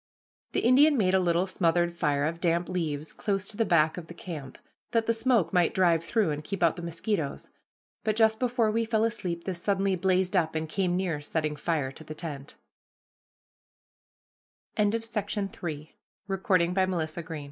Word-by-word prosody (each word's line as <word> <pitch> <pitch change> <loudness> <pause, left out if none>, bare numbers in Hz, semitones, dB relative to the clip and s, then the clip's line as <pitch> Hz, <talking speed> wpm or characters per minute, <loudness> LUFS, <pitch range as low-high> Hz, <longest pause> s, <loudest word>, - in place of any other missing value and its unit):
The - - +1
Indian 280 +5 +5
made 190 -4 +2
a 190 - +5
little 175 0 +2
smothered 175 -2 +1
fire 145 -4 +1
of 165 +2 -3
damp 170 0 +1
leaves 155 -4 -3
close 195 -1 -2
to - - -8
the 225 - +2
back 160 -3 +3
of 170 -2 -7
the 170 - -10
camp, 150 -7 -7 0.4
that 230 -1 +2
the 230 - +2
smoke 225 -5 +2
might 180 +3 +3
drive 170 -3 +3
through 200 0 +1
and 150 0 -4
keep 190 +1 -3
out 165 -2 +4
the 175 - -7
mosquitoes, 170 -2 -3 0.5
but 215 -1 +1
just 220 0 +3
before 240 -3 +1
we 230 +1 +1
fell 220 -1 +1
asleep 185 -7 -2
this 180 -3 -4
suddenly 195 -1 +1
blazed 185 +1 +1
up 160 -3 +1
and 160 0 -1
came 180 0 0
near 175 -6 -1
setting 155 0 -2
fire 150 -3 -1
to 160 - -11
t 155 +2 -6
180 Hz, 155 wpm, -28 LUFS, 165-205 Hz, 0.5 s, Indian